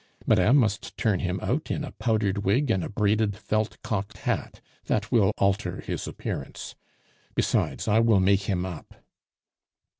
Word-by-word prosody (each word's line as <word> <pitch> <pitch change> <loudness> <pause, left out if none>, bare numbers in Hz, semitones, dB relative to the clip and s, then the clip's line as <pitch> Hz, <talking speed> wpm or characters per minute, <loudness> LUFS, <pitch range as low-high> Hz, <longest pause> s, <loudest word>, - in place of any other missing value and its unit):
Madame 130 +6 +5
must 110 -4 0
turn 105 -6 +1
him 90 +1 -2
out 145 +5 -1
in 150 - -1
a 140 - -6
powdered 105 -4 0
wig 115 +7 +1
and 95 -5 +1
a - - -4
braided 105 -1 +1
felt 110 +2 -2
cocked 100 -2 -3
hat; - - -3 0.3
that 105 0 -1
will 110 -6 +4
alter 100 -2 0
his - - -4
appearance. - - -6 0.6
Besides, - - 0
I 110 +1 +4
will 115 -3 +4
make 95 +1 +3
him 90 -2 0
us." 90 -4 -6
105 Hz, 155 wpm, -26 LUFS, 95-115 Hz, 0.6 s, Madame